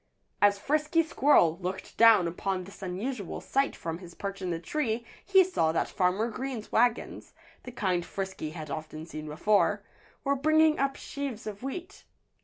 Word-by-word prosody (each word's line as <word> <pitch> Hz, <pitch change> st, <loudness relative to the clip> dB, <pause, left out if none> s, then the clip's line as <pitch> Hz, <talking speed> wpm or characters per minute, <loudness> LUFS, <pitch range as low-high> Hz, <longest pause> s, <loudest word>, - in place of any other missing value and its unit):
As 205 Hz, 0 st, +5 dB
Frisky 305 Hz, +8 st, +1 dB
Squirrel 265 Hz, -, +4 dB
looked 185 Hz, +1 st, -5 dB
down 225 Hz, -6 st, +6 dB
upon 185 Hz, +2 st, -2 dB
this 195 Hz, +2 st, -13 dB
unusual 195 Hz, +3 st, -4 dB
sight 275 Hz, +1 st, 0 dB
from 165 Hz, 0 st, -5 dB
his 175 Hz, -2 st, -12 dB
perch 195 Hz, -1 st, -5 dB
in 185 Hz, -, -2 dB
the 170 Hz, -, -1 dB
tree 235 Hz, -, -2 dB, 0.2 s
he 385 Hz, -1 st, +6 dB
saw 350 Hz, -, +1 dB
that 165 Hz, -, 0 dB
Farmer 190 Hz, +5 st, +1 dB
Green's 240 Hz, -1 st, -5 dB
wagons 240 Hz, +1 st, +1 dB, 0.3 s
the 250 Hz, -, -7 dB
kind 185 Hz, -7 st, 0 dB
Frisky 190 Hz, -4 st, -5 dB
had 155 Hz, -2 st, -7 dB
often 155 Hz, +1 st, -6 dB
seen 155 Hz, -2 st, -7 dB
before 200 Hz, +7 st, +2 dB, 0.4 s
were 280 Hz, 0 st, +2 dB
bringing 310 Hz, +2 st, +4 dB
up 275 Hz, 0 st, +1 dB
sheaves 275 Hz, -7 st, -6 dB
of 205 Hz, -2 st, -6 dB
wheat. 350 Hz, +9 st, -7 dB
205 Hz, 165 wpm, -29 LUFS, 180-275 Hz, 0.4 s, down